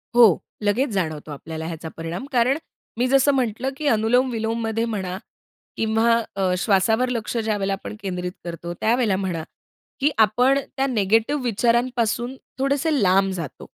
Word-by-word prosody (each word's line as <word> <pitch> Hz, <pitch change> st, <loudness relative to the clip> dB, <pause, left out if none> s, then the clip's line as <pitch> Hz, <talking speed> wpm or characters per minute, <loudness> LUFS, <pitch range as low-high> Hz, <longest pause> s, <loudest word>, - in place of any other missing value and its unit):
हो, 245 Hz, -, +8 dB, 0.4 s
लगेच 220 Hz, +7 st, +1 dB
जाणवतो 155 Hz, -5 st, -2 dB
आपल्याला 160 Hz, +2 st, -6 dB
ह्याचा 165 Hz, -1 st, -6 dB
परिणाम, 165 Hz, +7 st, -5 dB
कारण 255 Hz, +2 st, +3 dB, 0.4 s
मी 245 Hz, +2 st, +2 dB
जसं 275 Hz, +2 st, +4 dB
म्हटलं 255 Hz, -1 st, 0 dB
की 300 Hz, -, -2 dB
अनुलोम-विलोममध्ये 225 Hz, -1 st, +1 dB
म्हणा 190 Hz, -5 st, -3 dB, 0.6 s
किंवा 225 Hz, +1 st, +2 dB, 0.2 s
अ, 190 Hz, -2 st, +1 dB
श्वासावर 220 Hz, +6 st, +2 dB
लक्ष 235 Hz, -1 st, -2 dB
ज्यावेळेला 205 Hz, -3 st, 0 dB
आपण 195 Hz, +2 st, -6 dB
केंद्रित 180 Hz, -2 st, -3 dB
करतो, 170 Hz, 0 st, -5 dB
त्यावेळेला 225 Hz, -3 st, +2 dB
म्हणा 180 Hz, -4 st, -2 dB, 0.6 s
की 290 Hz, +2 st, +3 dB
आपण 245 Hz, +6 st, +4 dB, 0.2 s
त्या 270 Hz, -, +2 dB
निगेटिव्ह 225 Hz, +4 st, +1 dB
विचारांपासून 240 Hz, +1 st, +1 dB, 0.2 s
थोडेसे 280 Hz, +2 st, +1 dB
लांब 195 Hz, 0 st, +3 dB
जातो. 165 Hz, -7 st, -6 dB
220 Hz, 135 wpm, -23 LUFS, 190-250 Hz, 0.6 s, हो